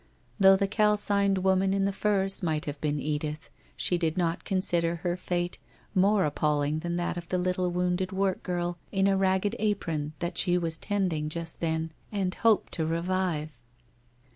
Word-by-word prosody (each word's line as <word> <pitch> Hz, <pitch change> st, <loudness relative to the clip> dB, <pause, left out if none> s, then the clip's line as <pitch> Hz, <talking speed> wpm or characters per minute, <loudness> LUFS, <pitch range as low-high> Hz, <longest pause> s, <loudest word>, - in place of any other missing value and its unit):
Though 195 Hz, 0 st, +8 dB
the 195 Hz, +1 st, +1 dB
calcined 205 Hz, -2 st, +2 dB
woman 190 Hz, +1 st, +2 dB
in 195 Hz, 0 st, +1 dB
the 200 Hz, -, 0 dB
furs 195 Hz, -1 st, +1 dB
might 155 Hz, -4 st, -1 dB
have 145 Hz, -1 st, -6 dB
been 150 Hz, -1 st, 0 dB
Edith, 150 Hz, +1 st, -3 dB, 0.3 s
she 175 Hz, -, +2 dB
did 165 Hz, -1 st, 0 dB
not 170 Hz, -2 st, 0 dB
consider 170 Hz, -3 st, 0 dB
her 175 Hz, +1 st, -2 dB
fate 175 Hz, -1 st, -3 dB, 0.3 s
more 195 Hz, 0 st, +3 dB
appalling 150 Hz, 0 st, 0 dB
than 170 Hz, +1 st, -3 dB
that 175 Hz, 0 st, -2 dB
of 170 Hz, -1 st, -7 dB
the 185 Hz, -, 0 dB
little 180 Hz, 0 st, 0 dB
wounded 180 Hz, +1 st, -1 dB
work 190 Hz, -1 st, 0 dB
girl 175 Hz, -1 st, -2 dB
in 195 Hz, -1 st, +2 dB
a 195 Hz, 0 st, +3 dB
ragged 190 Hz, +2 st, +1 dB
apron 160 Hz, -8 st, -1 dB
that 170 Hz, 0 st, -2 dB
she 180 Hz, -2 st, +4 dB
was 165 Hz, -2 st, -3 dB
tending 180 Hz, -7 st, -1 dB
just 165 Hz, +1 st, -4 dB
then 160 Hz, -1 st, -1 dB, 0.2 s
and 195 Hz, -3 st, -1 dB
hoped 225 Hz, 0 st, +2 dB
to 160 Hz, -, 0 dB
revive. 165 Hz, -5 st, -2 dB
180 Hz, 170 wpm, -28 LUFS, 165-195 Hz, 0.3 s, Though